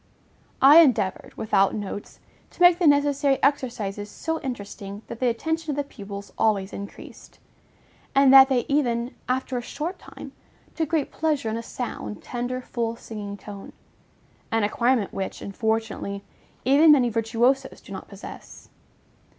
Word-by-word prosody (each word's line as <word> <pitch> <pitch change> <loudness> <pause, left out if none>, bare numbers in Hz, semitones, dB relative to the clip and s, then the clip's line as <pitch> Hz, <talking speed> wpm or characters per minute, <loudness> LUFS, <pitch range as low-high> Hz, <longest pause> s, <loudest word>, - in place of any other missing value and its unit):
I 290 +4 +10
endeavored, 220 - +2
without 195 -3 +2
notes, 205 -1 -6 0.3
to - - -22
make 350 0 +7
the 350 - +3
necessary 285 -1 +3
exercises 225 -7 -1
so 320 +9 -3
interesting 205 -5 -7
that 235 - -8
the 255 - +1
attention 320 +7 -2
of 290 - 0
the 285 - 0
pupils 200 -6 -9
always 200 -3 +1
increased; 200 0 -10 0.8
and 275 -1 +6
that 270 0 +9
they 250 -3 +1
even, 245 -4 0 0.2
after 255 0 -1
a - - -5
short 310 +9 -5
time, - - -11 0.4
took 320 -3 -2
great 320 -4 0
pleasure 300 -7 -1
in - - -2
a 230 - -3
sound, 230 -3 -6
tender, 250 +1 -4
full, 230 -2 -3
singing 205 -3 -7
tone; 200 -1 -10 0.8
an 225 -1 +1
acquirement 235 +1 +1
which, 195 - -4
unfortunately, 215 -1 -3 0.4
even 290 +5 +6
many 260 -5 +5
virtuosos 230 +4 0
do - - -15
not - - -7
possess. - - -11
240 Hz, 145 wpm, -24 LUFS, 210-280 Hz, 0.8 s, I